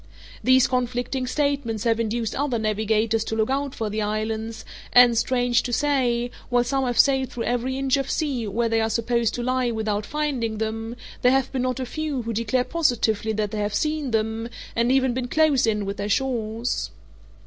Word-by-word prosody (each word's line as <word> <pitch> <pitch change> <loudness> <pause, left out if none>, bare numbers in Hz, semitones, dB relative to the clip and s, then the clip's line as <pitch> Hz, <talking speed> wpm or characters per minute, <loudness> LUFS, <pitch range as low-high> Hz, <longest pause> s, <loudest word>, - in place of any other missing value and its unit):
These 255 0 +5
conflicting 250 +1 -1
statements 275 -6 -1
have 230 -1 +2
induced 225 0 -1
other 275 -3 -1
navigators 220 +1 +1
to 220 - -3
look 220 +3 +1
out 275 0 -1
for 220 - -2
the 215 +1 -2
islands; 220 +1 -3 0.3
and, 245 -1 +7
strange 245 +1 +2
to 245 - -5
say, 245 -3 +1 0.2
while 245 -1 +3
some 270 +2 0
have 245 -1 -1
sailed 265 -2 +4
through 235 - -4
every 245 +2 -1
inch 270 0 +1
of 275 -1 -2
sea 270 -8 -1
where 230 +4 0
they 225 0 +1
are 220 - +1
supposed 230 0 0
to 240 - -3
lie 255 0 +1
without 215 -2 -2
finding 270 -7 -2
them, 225 +1 -3 0.3
there 250 - +5
have 270 -1 +1
been 260 - -1
not 255 0 -1
a 260 - -2
few 295 -1 -3
who 230 0 -3
declare 230 +3 +1
positively 245 -7 +1
that 210 -1 -1
they 215 - -3
have 205 0 -1
seen 305 -3 -1
them; 225 0 -1 0.3
and 235 +2 +2
even 260 -1 +3
been 250 0 -2
close 295 -3 +3
in 210 -2 0
with 200 +1 -4
their 205 +1 -3
shores. 230 -1 -1
240 Hz, 195 wpm, -24 LUFS, 220-260 Hz, 0.3 s, and